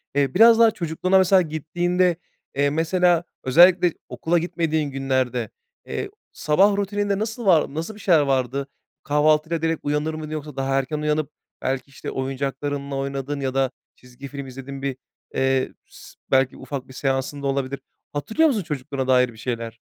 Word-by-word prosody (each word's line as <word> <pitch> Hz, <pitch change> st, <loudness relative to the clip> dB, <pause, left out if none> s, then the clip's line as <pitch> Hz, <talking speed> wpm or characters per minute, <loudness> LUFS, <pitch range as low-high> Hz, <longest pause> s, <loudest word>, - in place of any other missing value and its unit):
Eee, 140 Hz, -2 st, +2 dB
biraz 230 Hz, +3 st, +7 dB
daha 225 Hz, -1 st, +7 dB
çocukluğuna 180 Hz, +2 st, +1 dB
mesela 190 Hz, 0 st, +5 dB
gittiğinde, 175 Hz, +3 st, 0 dB, 0.4 s
eee, 140 Hz, 0 st, +2 dB
mesela 170 Hz, +2 st, +2 dB, 0.2 s
özellikle 175 Hz, +5 st, +6 dB, 0.2 s
okula 170 Hz, +2 st, 0 dB
gitmediğin 160 Hz, -4 st, -1 dB
günlerde, 130 Hz, -3 st, -1 dB, 0.4 s
eee, 405 Hz, -, -4 dB, 0.2 s
sabah 195 Hz, +7 st, +3 dB
rutininde 205 Hz, 0 st, -1 dB
nasıl 220 Hz, +1 st, -4 dB
var 165 Hz, -6 st, +4 dB
nasıl 165 Hz, +7 st, -4 dB
bir -, -, -13 dB
şeyler 170 Hz, -6 st, +4 dB
vardı? 135 Hz, 0 st, 0 dB, 0.4 s
Kahvaltıyla 155 Hz, +2 st, +2 dB
direkt 165 Hz, -1 st, 0 dB
uyanır 150 Hz, +2 st, -1 dB
mıydın? 155 Hz, -1 st, -6 dB
Yoksa 150 Hz, -2 st, -6 dB
daha 135 Hz, 0 st, -1 dB
erken 150 Hz, +3 st, -3 dB
uyanıp 150 Hz, 0 st, 0 dB, 0.3 s
belki, 135 Hz, +1 st, -2 dB
işte, 135 Hz, -, -7 dB
oyuncaklarınla 140 Hz, +1 st, -3 dB
oynadın 140 Hz, +1 st, -3 dB
ya 135 Hz, -2 st, -2 dB
da 135 Hz, -1 st, +1 dB, 0.2 s
çizgi 125 Hz, +2 st, -12 dB
film 140 Hz, -1 st, -7 dB
izlediğin 135 Hz, +1 st, -8 dB
bir, 135 Hz, -2 st, -3 dB, 0.4 s
eee, 135 Hz, 0 st, +1 dB
s -, -, -15 dB, 0.2 s
belki 130 Hz, -1 st, +3 dB
ufak 135 Hz, -3 st, -6 dB
bir 130 Hz, -, -13 dB
seansın 135 Hz, +1 st, -2 dB
da -, -, 0 dB
olabilir. 135 Hz, 0 st, -2 dB, 0.3 s
Hatırlıyor 220 Hz, -, +2 dB
musun, 215 Hz, -8 st, 0 dB
çocukluğuna 140 Hz, -2 st, -4 dB
dair 125 Hz, -1 st, +4 dB
bir -, -, -17 dB
şeyler? 115 Hz, -1 st, -4 dB
145 Hz, 160 wpm, -23 LUFS, 135-170 Hz, 0.4 s, biraz